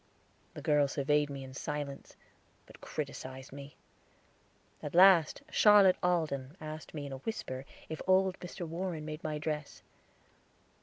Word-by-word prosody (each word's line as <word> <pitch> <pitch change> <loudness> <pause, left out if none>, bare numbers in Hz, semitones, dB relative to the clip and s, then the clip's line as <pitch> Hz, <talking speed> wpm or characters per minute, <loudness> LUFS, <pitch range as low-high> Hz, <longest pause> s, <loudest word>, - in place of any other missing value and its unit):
The - - -8
girls 145 -2 +3
surveyed 145 +1 +2
me 140 -1 -6
in 130 0 -10
silence; 145 0 -5 0.5
but - - -16
criticised 130 +1 -6
me. 140 0 -10 1.1
At 150 - -6
last 180 -3 +6
Charlotte 205 -3 +6
Alden 160 -4 0
asked 155 +1 -8
me 145 -2 -4
in 140 - -7
a 135 - -5
whisper 130 -6 -5 0.2
if 160 - -6
old 190 0 +3
Mr. 175 0 -6
Warren 165 -1 -4
made 155 +1 -6
my 155 -1 -2
dress. 150 -1 -4
150 Hz, 140 wpm, -32 LUFS, 140-175 Hz, 1.1 s, last